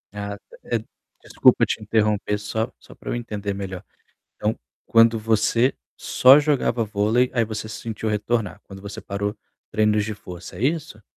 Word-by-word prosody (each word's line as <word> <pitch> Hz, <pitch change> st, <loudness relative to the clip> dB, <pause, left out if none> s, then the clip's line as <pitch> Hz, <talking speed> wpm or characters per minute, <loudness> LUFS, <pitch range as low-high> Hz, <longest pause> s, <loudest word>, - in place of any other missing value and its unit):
Ah, 100 Hz, 0 st, -4 dB, 0.3 s
eh 115 Hz, -, 0 dB, 0.4 s
desculpa -, -, +4 dB
te 110 Hz, -, -3 dB
interromper, 105 Hz, -1 st, +1 dB
só 110 Hz, +2 st, -3 dB
só -, -, -15 dB
pra -, -, -9 dB
eu -, -, -1 dB
entender 105 Hz, -4 st, -4 dB
melhor. 95 Hz, -1 st, -6 dB, 0.5 s
Então 105 Hz, +1 st, -1 dB, 0.3 s
quando 115 Hz, 0 st, +5 dB
você 115 Hz, +3 st, +2 dB, 0.2 s
só 130 Hz, +3 st, +6 dB
jogava 140 Hz, -6 st, +1 dB
vôlei, 110 Hz, +4 st, +1 dB
aí 115 Hz, -2 st, +3 dB
você 110 Hz, 0 st, -5 dB
se 110 Hz, -, -7 dB
sentiu 110 Hz, -1 st, -4 dB
retornar, 105 Hz, -2 st, -1 dB
quando 95 Hz, -1 st, -12 dB
você 100 Hz, 0 st, -7 dB
parou 100 Hz, +1 st, -3 dB, 0.4 s
treinos 105 Hz, -1 st, +2 dB
de 110 Hz, -1 st, -4 dB
força, 90 Hz, -3 st, -10 dB
é -, -, -6 dB
isso? 150 Hz, -7 st, -1 dB
110 Hz, 160 wpm, -23 LUFS, 105-115 Hz, 0.5 s, só